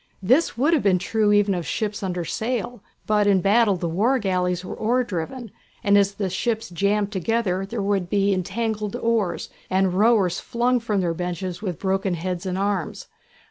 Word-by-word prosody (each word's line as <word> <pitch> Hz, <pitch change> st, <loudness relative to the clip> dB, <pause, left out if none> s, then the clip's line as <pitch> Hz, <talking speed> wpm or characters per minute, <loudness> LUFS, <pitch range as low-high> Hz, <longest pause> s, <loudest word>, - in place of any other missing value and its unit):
This 255 Hz, -, +3 dB
would 290 Hz, +7 st, +3 dB
have 310 Hz, -, +3 dB
been 195 Hz, -2 st, +3 dB
true 210 Hz, +3 st, +1 dB
even 205 Hz, -1 st, +3 dB
of 175 Hz, -2 st, -2 dB
ships 210 Hz, +4 st, -2 dB
under 180 Hz, -3 st, -3 dB
sail, 235 Hz, +2 st, -3 dB, 0.2 s
but 210 Hz, -1 st, +2 dB
in 195 Hz, -2 st, +4 dB
battle 205 Hz, +2 st, +3 dB
the 175 Hz, -1 st, -3 dB
war 215 Hz, +11 st, +2 dB
galleys 180 Hz, -4 st, -1 dB
were -, -, -5 dB
oar 245 Hz, +4 st, +1 dB
driven, 225 Hz, +3 st, -5 dB, 0.3 s
and 200 Hz, 0 st, +4 dB
as 200 Hz, 0 st, +3 dB
the 200 Hz, -, -2 dB
ships 220 Hz, +4 st, -2 dB
jammed 200 Hz, +3 st, 0 dB
together 195 Hz, -1 st, -1 dB
there 215 Hz, 0 st, -3 dB
would 195 Hz, -3 st, 0 dB
be 200 Hz, 0 st, +2 dB
entangled 210 Hz, +3 st, -2 dB
oars, 230 Hz, -6 st, -1 dB, 0.2 s
and 190 Hz, -1 st, +2 dB
rowers 200 Hz, -3 st, +3 dB
flung 245 Hz, +1 st, 0 dB
from 215 Hz, -4 st, -1 dB
their 170 Hz, -2 st, 0 dB
benches 180 Hz, +1 st, -4 dB
with 185 Hz, -7 st, -3 dB
broken 190 Hz, -1 st, 0 dB
heads 180 Hz, +2 st, -4 dB
and 185 Hz, 0 st, -2 dB
arms. 195 Hz, -4 st, -2 dB
200 Hz, 180 wpm, -23 LUFS, 185-225 Hz, 0.3 s, in